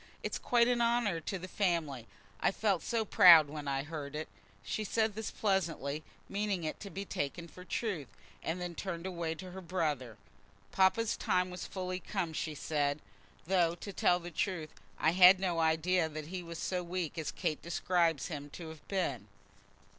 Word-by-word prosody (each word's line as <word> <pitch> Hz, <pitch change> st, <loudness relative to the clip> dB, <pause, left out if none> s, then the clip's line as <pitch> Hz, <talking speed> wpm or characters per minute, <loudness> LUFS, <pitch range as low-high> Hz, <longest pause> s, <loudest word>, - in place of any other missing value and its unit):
"It's -, -, -2 dB
quite 235 Hz, -1 st, +3 dB
an 245 Hz, -1 st, +2 dB
honour 235 Hz, -7 st, +2 dB
to 190 Hz, +4 st, -4 dB
the 185 Hz, +1 st, -7 dB
family. 165 Hz, -, -1 dB, 0.3 s
I -, -, +3 dB
felt 195 Hz, -4 st, +1 dB
so 230 Hz, -2 st, -1 dB
proud 165 Hz, -6 st, +8 dB
when 150 Hz, -1 st, -6 dB
I 135 Hz, 0 st, 0 dB
heard 150 Hz, -2 st, -6 dB
it!" 155 Hz, +1 st, -4 dB, 0.3 s
She 215 Hz, -, -2 dB
said 220 Hz, +1 st, +1 dB
this 220 Hz, +1 st, -4 dB
pleasantly, 165 Hz, -8 st, -1 dB, 0.3 s
meaning 200 Hz, -3 st, -1 dB
it 155 Hz, -, -3 dB
to 200 Hz, -, -7 dB
be 195 Hz, +3 st, -5 dB
taken 170 Hz, +1 st, -3 dB
for 180 Hz, +2 st, -12 dB
truth, 185 Hz, -, -2 dB, 0.3 s
and 165 Hz, +3 st, -2 dB
then 180 Hz, -1 st, -4 dB
turned 170 Hz, -1 st, -5 dB
away 170 Hz, -3 st, -2 dB
to 180 Hz, +3 st, -9 dB
her 190 Hz, +1 st, -7 dB
brother. 150 Hz, -, -2 dB, 0.5 s
"Papa's 195 Hz, +4 st, +3 dB
time 180 Hz, 0 st, +1 dB
was 180 Hz, -, -6 dB
fully 185 Hz, -1 st, -4 dB
come," 180 Hz, -3 st, -3 dB
she 155 Hz, 0 st, -3 dB
said, 145 Hz, -1 st, 0 dB, 0.5 s
"though, 175 Hz, -2 st, +2 dB
to 195 Hz, +3 st, -8 dB
tell 180 Hz, -1 st, +3 dB
the 175 Hz, 0 st, -8 dB
truth, 165 Hz, -2 st, -2 dB, 0.3 s
I 160 Hz, -, +3 dB
had 185 Hz, +1 st, +8 dB
no 180 Hz, -3 st, 0 dB
idea 160 Hz, +1 st, +2 dB
that 155 Hz, 0 st, -7 dB
he 185 Hz, 0 st, -4 dB
was 170 Hz, -1 st, -7 dB
so 180 Hz, +2 st, -1 dB
weak 175 Hz, -2 st, -3 dB
as 155 Hz, -, -2 dB
Kate 160 Hz, -5 st, -2 dB
describes 170 Hz, -3 st, +1 dB
him 145 Hz, -3 st, -5 dB
to 165 Hz, -2 st, -7 dB
have 160 Hz, -2 st, -12 dB
been." 140 Hz, -, -1 dB
175 Hz, 185 wpm, -33 LUFS, 155-190 Hz, 0.5 s, proud